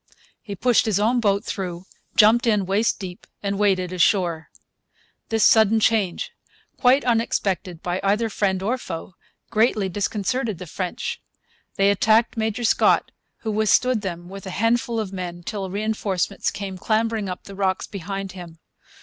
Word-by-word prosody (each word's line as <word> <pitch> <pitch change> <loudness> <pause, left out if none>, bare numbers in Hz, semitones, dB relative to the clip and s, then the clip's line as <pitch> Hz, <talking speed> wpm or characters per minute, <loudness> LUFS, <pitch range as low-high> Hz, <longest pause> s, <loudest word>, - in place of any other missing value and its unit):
He 205 -3 -7
pushed 240 +3 +3
his 205 -2 +2
own 235 +4 +2
boat 200 -3 +1
through, 180 -2 -5 0.3
jumped 230 +3 +5
in 210 -4 +2
waist 200 +5 +1
deep, 185 -3 -8 0.2
and 200 0 -2
waded 185 -3 +1
ashore. 170 -1 +1 0.8
This 225 -1 +3
sudden 220 0 +5
change, 210 -5 +1 0.4
quite 260 +2 +3
unexpected 195 -7 -1
by 180 +1 -1
either 210 +4 +2
friend 195 -3 -1
or 245 +6 0
foe, 175 -3 -7 0.4
greatly 215 -3 +2
disconcerted 210 +3 -1
the 180 - -8
French. 180 +2 -4 0.5
They 195 +1 +4
attacked 220 +3 +3
Major 220 +1 -2
Scott, 225 - +3 0.3
who 220 - -2
withstood 220 +3 +2
them 175 -3 -5
with 195 +1 -9
a 185 - -5
handful 230 +1 +1
of 200 -3 -4
men 175 -2 -5
till 195 -1 -4
reinforcements 200 -1 -1
came 195 -2 -6
clambering 220 -1 0
up 180 - -6
the 200 - -10
rocks 190 -1 -1
behind 195 0 -5
him. 175 -3 -10
200 Hz, 150 wpm, -23 LUFS, 185-220 Hz, 0.8 s, jumped